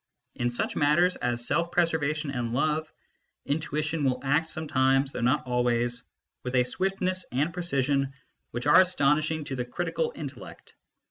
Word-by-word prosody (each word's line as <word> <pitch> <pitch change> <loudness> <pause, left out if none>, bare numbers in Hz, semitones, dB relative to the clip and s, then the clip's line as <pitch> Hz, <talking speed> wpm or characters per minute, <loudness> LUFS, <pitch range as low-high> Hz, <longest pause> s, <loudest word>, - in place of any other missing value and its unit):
In 120 0 -1
such 120 - -2
matters 170 +5 +3
as 120 -1 -1
self 170 +5 +1
preservation 155 -3 +1
and 120 -3 -3
love, 155 +3 0 0.5
intuition 150 +1 -1
will 130 -2 +1
act 150 +4 +1
sometimes 135 -3 +1
(though - - -5
not 130 +5 +2
always) 120 -1 0 0.4
with 125 +1 -4
a 125 - +5
swiftness 185 +6 -1
and 145 +7 0
precision 140 -6 0 0.4
which 120 +2 -5
are 150 +5 +8
astonishing 155 -3 +2
to 135 -2 -5
the 125 - -2
critical 465 - -2
intellect. - - -9
145 Hz, 145 wpm, -27 LUFS, 125-160 Hz, 0.5 s, are